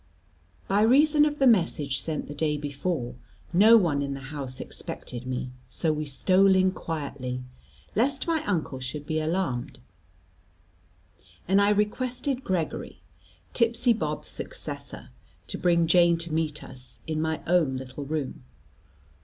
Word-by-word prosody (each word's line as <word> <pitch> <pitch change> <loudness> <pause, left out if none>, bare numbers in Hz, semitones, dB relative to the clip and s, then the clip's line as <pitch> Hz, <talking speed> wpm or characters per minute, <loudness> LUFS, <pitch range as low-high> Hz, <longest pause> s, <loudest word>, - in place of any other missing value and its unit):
By 200 +1 +2
reason 295 +6 +5
of 295 -1 -1
the 275 - +3
message 165 - +3
sent 155 -2 -3
the 145 - -6
day 150 0 0
before, 145 -3 -3 0.4
no 215 +6 +8
one 160 -9 +2
in 140 -1 -2
the 135 +1 -9
house 135 -3 -5
expected 125 +1 -7
me; 125 0 -3 0.2
so 160 +4 +1
we 155 0 -3
stole 190 +7 +4
in 185 0 +4
quietly, 140 -7 -4 0.5
lest 260 +4 +1
my 325 -2 0
uncle 160 -8 -1
should 130 +3 -6
be 155 +1 -1
alarmed, 155 -6 -2 1.7
and 195 +3 +4
I 200 - +4
requested 250 +6 0
Gregory, 180 -4 -3 0.5
tipsy 235 +1 +3
Bob's 225 - -3
successor, - - -7 0.4
to - - -5
bring 170 -2 +3
Jane 170 0 +5
to 165 -1 -4
meet 155 -2 -1
us, 125 -1 -8
in 155 -1 -2
my 160 0 -1
own 160 -7 +2
little 130 +2 -7
room. 145 -3 -4
160 Hz, 140 wpm, -27 LUFS, 140-205 Hz, 1.7 s, no